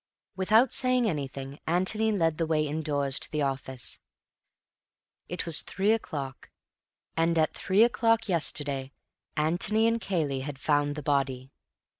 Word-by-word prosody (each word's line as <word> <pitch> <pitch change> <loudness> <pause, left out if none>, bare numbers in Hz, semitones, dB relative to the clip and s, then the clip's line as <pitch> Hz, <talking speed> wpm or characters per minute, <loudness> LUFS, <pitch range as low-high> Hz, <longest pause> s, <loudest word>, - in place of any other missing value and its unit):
Without 220 +6 +3
saying 255 -2 +2
anything, 140 -4 -4
Antony 190 +6 +1
led 165 -6 0
the 165 - 0
way 155 -1 +1
indoors 145 -3 0
to - - -3
the 150 -1 -1
office. 130 -2 -4 1.3
It 175 - -3
was 165 -2 +6
three 200 +2 0
o'clock, 145 - -4 0.7
and 165 +1 +1
at 155 -1 +2
three 200 +4 +3
o'clock 230 -1 +2
yesterday 145 -6 -1 0.4
Antony 180 +8 +2
and 230 0 +1
Cayley 155 -10 -1
had 135 +1 -6
found 145 +1 +1
the 150 - -6
body. 135 -2 -1
155 Hz, 135 wpm, -28 LUFS, 140-200 Hz, 1.3 s, was